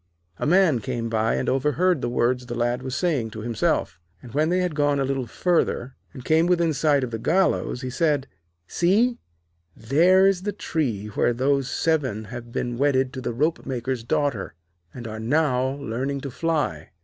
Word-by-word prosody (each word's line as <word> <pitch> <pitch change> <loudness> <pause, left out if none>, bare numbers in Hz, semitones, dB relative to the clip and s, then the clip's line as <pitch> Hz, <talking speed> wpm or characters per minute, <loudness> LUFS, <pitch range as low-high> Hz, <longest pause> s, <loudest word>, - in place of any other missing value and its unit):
A - - -1
Man 170 -6 +4
came 115 -1 -3
by 110 0 +1
and - - -2
overheard 150 +5 +1
the - - -1
words 125 +1 0
the 120 - -4
Lad 120 +1 0
was 130 0 -4
saying 145 -9 0
to 110 0 -8
himself, 110 -8 -1 0.2
and 120 - -13
when 155 +3 +2
they 180 - +2
had 180 -2 0
gone 145 -1 +1
a 135 - +1
little 135 -2 -2
further, 135 -4 0 0.2
and 130 -4 -11
came 160 +2 +3
within 170 -3 +2
sight 145 -2 +2
of 125 - -4
the 115 - -4
gallows, 170 - +1
he 130 -1 -4
said: 145 -1 +1 0.4
'See, 220 - +2 0.6
there 170 +11 +4
is 195 -2 +3
the 205 +2 -3
tree 135 - -2
where 115 +3 +1
those 135 +1 +1
seven 135 -11 0
have 120 -1 -8
been 120 0 -3
wedded 135 -2 +2
to 130 - -5
the - - -2
ropemaker's 130 -3 -2
daughter, 115 - -1 0.4
and 120 +2 -8
are 110 0 -6
now 130 +1 +1
learning 140 +1 -3
to 140 - -6
fly. 145 - -2
135 Hz, 185 wpm, -24 LUFS, 120-160 Hz, 0.6 s, Man